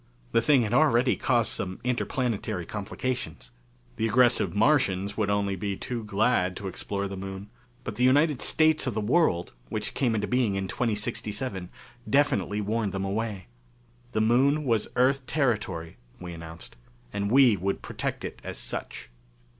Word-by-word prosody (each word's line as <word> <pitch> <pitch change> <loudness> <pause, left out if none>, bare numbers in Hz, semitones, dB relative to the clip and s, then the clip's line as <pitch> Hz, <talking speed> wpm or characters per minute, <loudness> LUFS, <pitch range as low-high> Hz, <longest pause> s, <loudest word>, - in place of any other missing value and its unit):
The 115 - +3
thing 135 0 +4
had 110 +1 -2
already 125 -3 +4
caused 120 -3 +1
some 95 -1 -4
interplanetary 120 - -1
complications. 105 - -4 0.5
The 110 - +1
aggressive 120 -1 +3
Martians 100 -6 +2
would 110 -2 0
be - - 0
only 100 -1 -1
too 120 -2 -4
glad 100 -3 +1
to 100 - -5
explore 100 +2 -3
the 100 - -6
Moon. 95 +2 -7 0.3
But 110 -4 -6
the 125 - +1
United 145 +2 +4
States 155 -2 +3
of 125 - -2
the - - 0
World, 105 - +2 0.2
which 105 -1 -3
came 120 -5 +1
into 105 -1 0
being 125 -4 +1
in 95 0 -2
2067, 105 -3 -3 0.4
definitely 105 -8 +2
warned 105 0 -1
them 95 0 -2
away. 100 -1 -3 0.7
The 110 - +1
Moon 135 +7 +3
was 115 -6 +1
Earth 130 +1 +2
territory, 105 - -1 0.2
we 90 -1 -7
announced, 80 -5 -10 0.4
and 100 0 -1
we 130 -2 +6
would 100 +1 -2
protect - - -4
it - - -7
as - - -6
such. - - -5
110 Hz, 155 wpm, -27 LUFS, 100-125 Hz, 0.7 s, we